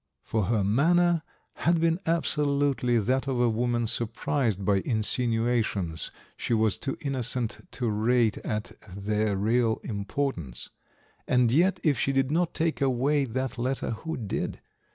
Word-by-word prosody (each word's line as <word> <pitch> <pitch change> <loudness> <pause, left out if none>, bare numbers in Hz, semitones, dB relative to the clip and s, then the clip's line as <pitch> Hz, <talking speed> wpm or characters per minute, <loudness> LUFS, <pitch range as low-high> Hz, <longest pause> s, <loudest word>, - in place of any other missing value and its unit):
For 110 -3 0
her 110 0 +1
manner 170 - +3 0.4
had 170 0 +2
been 165 +1 +2
absolutely 145 -6 +1
that 130 +5 +1
of 130 -2 0
a 120 - +4
woman 120 +1 0
surprised 115 -2 -1
by 100 0 +3
insinuations 115 -5 0 0.3
she 120 - -1
was 110 -3 +2
too 140 +4 -3
innocent 125 -1 -2
to 125 - -2
rate 110 +1 +2
at 105 -1 -3 0.3
their 105 0 0
real 115 +3 +2
importance; 100 - -3 0.6
and 125 -2 +3
yet 175 +9 +3
if 145 -7 +2
she 135 - +1
did 135 0 +1
not 170 +1 0
take 160 -2 0
away 135 +2 +2
that 130 0 -3
letter 130 +1 -1
who 160 +9 -4
did? 105 -5 -3
125 Hz, 140 wpm, -27 LUFS, 110-140 Hz, 0.6 s, a